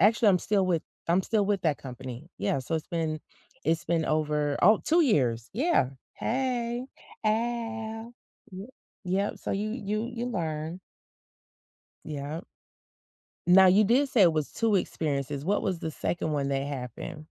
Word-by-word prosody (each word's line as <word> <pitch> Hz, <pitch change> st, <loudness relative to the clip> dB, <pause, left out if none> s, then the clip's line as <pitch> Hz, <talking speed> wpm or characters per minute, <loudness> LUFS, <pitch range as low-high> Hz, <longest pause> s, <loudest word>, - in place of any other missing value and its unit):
Actually, 220 Hz, +1 st, +5 dB
I'm 185 Hz, -, +5 dB
still 195 Hz, 0 st, +1 dB
with 170 Hz, -3 st, +1 dB, 0.3 s
I'm 175 Hz, +3 st, +3 dB
still 210 Hz, 0 st, +1 dB
with 200 Hz, -2 st, 0 dB
that 155 Hz, -4 st, +1 dB
company. 130 Hz, +3 st, -8 dB
Yeah, -, -, 0 dB
so, 130 Hz, +5 st, -3 dB
it's 155 Hz, -, -5 dB
been 160 Hz, -2 st, -2 dB, 0.4 s
it's 165 Hz, +1 st, +1 dB
been 165 Hz, -1 st, +1 dB
over 150 Hz, -1 st, +1 dB
oh, 210 Hz, +4 st, +6 dB
2 335 Hz, +2 st, +4 dB
years. 125 Hz, -, +2 dB
Yeah. 255 Hz, -, +2 dB, 0.2 s
Hey. 245 Hz, -1 st, -1 dB, 0.4 s
Ow. 225 Hz, 0 st, -2 dB, 0.4 s
Y 190 Hz, +2 st, -7 dB, 0.4 s
Yep, 190 Hz, +3 st, 0 dB
so, -, -, -5 dB
you 210 Hz, +2 st, -1 dB
you 215 Hz, -1 st, -2 dB
you 235 Hz, +1 st, -3 dB
learn. 165 Hz, -6 st, -3 dB, 1.3 s
Yep. 150 Hz, +3 st, -5 dB, 1.0 s
Now 190 Hz, +2 st, +8 dB
you 195 Hz, +4 st, +6 dB
did 260 Hz, +7 st, +3 dB
say 235 Hz, -5 st, +4 dB
it 170 Hz, -3 st, +6 dB
was 155 Hz, -2 st, -1 dB
2 225 Hz, -2 st, +1 dB
experiences. 145 Hz, -5 st, -2 dB
What 205 Hz, +4 st, +2 dB
was 185 Hz, -3 st, -1 dB
the 160 Hz, -, -3 dB
2nd 160 Hz, +1 st, -2 dB
one 140 Hz, -2 st, 0 dB
that 135 Hz, 0 st, -1 dB
happened? 140 Hz, +4 st, -6 dB
180 Hz, 155 wpm, -28 LUFS, 150-220 Hz, 1.3 s, Now